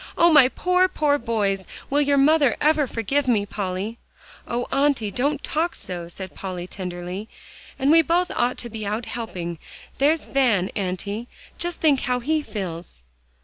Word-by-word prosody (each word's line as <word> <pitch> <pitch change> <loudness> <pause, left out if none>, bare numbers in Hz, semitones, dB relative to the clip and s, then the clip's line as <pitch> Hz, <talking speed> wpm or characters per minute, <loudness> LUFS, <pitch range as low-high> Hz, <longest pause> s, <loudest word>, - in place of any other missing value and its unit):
"Oh! 340 -1 +6
my 285 -4 +8
poor, 360 +6 +2
poor 300 -5 +1
boys. 205 -5 0 0.3
Will 290 +1 +3
your 285 -1 +3
mother 285 -2 +4
ever 300 -2 +3
forgive 260 +5 -1
me, 215 -5 +2
Polly?" 200 +3 -4 0.5
"Oh, 240 +1 -2
Auntie! 270 -6 +1
don't 285 +5 -1
talk 330 +3 -1
so," 175 -2 -5
said 185 +2 -8
Polly 185 -2 -5
tenderly; 180 +2 -6 0.5
"and 275 +2 +2
we 330 +1 +7
both 345 +3 +1
ought 245 +1 +1
to 240 - -6
be 220 -1 -5
out 215 +3 -2
helping. 180 -9 -5 0.4
There's 300 +3 +3
Van, 230 -9 +2
Auntie; 200 +4 -3 0.3
just 345 0 -2
think 290 -4 +4
how 250 -1 0
he 305 +5 0
feels." 175 - -6
240 Hz, 160 wpm, -23 LUFS, 195-290 Hz, 0.5 s, my